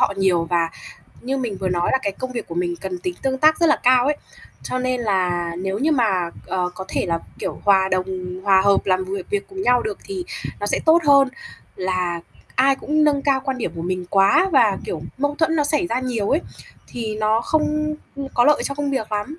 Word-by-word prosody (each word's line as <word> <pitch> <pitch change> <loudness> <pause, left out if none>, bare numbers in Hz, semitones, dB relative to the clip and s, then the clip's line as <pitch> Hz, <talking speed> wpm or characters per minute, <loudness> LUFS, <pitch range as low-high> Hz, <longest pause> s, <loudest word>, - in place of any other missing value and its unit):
họ 200 - +2
nhiều, 180 -3 +2
và 170 -1 0 0.5
như 265 +2 -2
mình 230 -6 -3
vừa 190 -1 -1
nói 175 -1 0
là 265 - +4
cái 200 - -1
công 255 +4 -6
việc 235 -4 -5
của 165 - -6
mình 175 0 -1
cần 185 -2 -4
tính 180 0 -4
tương 265 -1 0
tác 310 +2 +5
rất 335 - +5
là 300 - +4
cao 250 0 +5
ấy, 295 0 +1 0.5
cho 255 - -3
nên 255 -1 -1
là 180 -4 0
nếu 190 +2 -2
như 310 +5 +2
mà, 195 - +1 0.2
ờ, 180 -1 -1
có 190 - -6
thể - - -1
là, 165 -1 0 0.2
kiểu, - - -5
hòa 190 -1 +4
đồng, 185 0 -3
hòa 190 -1 +5
hợp 200 0 +3
làm 185 -1 +2
việc 190 0 -6
việc 410 -1 -2
cùng 385 0 -6
nhau 245 -1 +3
được 210 -2 -4
thì 375 -3 -5 0.4
nó 205 - -2
sẽ - - 0
tốt 330 +2 +6
hơn 275 -2 +6 0.5
là 185 -2 -1 0.3
ai 270 +1 +4
cũng 305 +2 +1
nâng 285 -2 +2
cao 275 -2 +2
quan 265 -2 -2
điểm - - -3
của 165 - -4
mình 180 0 -3
quá, 200 - +4
và, 225 -8 +4
kiểu, 160 -3 -4 0.2
mâu 290 +1 0
thuẫn 325 0 +2
nó 295 - +2
xảy 300 +4 +1
ra 250 -5 -1
nhiều 240 -5 -2
ấy. 305 - +3 0.5
Thì 220 -3 -4
nó 215 +1 +2
không, 305 +2 0 0.2
ưm, 275 -1 -5
có 240 - +4
lợi 300 - +4
cho 280 - -2
công 290 -1 -2
việc 220 -6 -3
lắm, 255 +11 -3
220 Hz, 235 wpm, -21 LUFS, 185-280 Hz, 0.5 s, tốt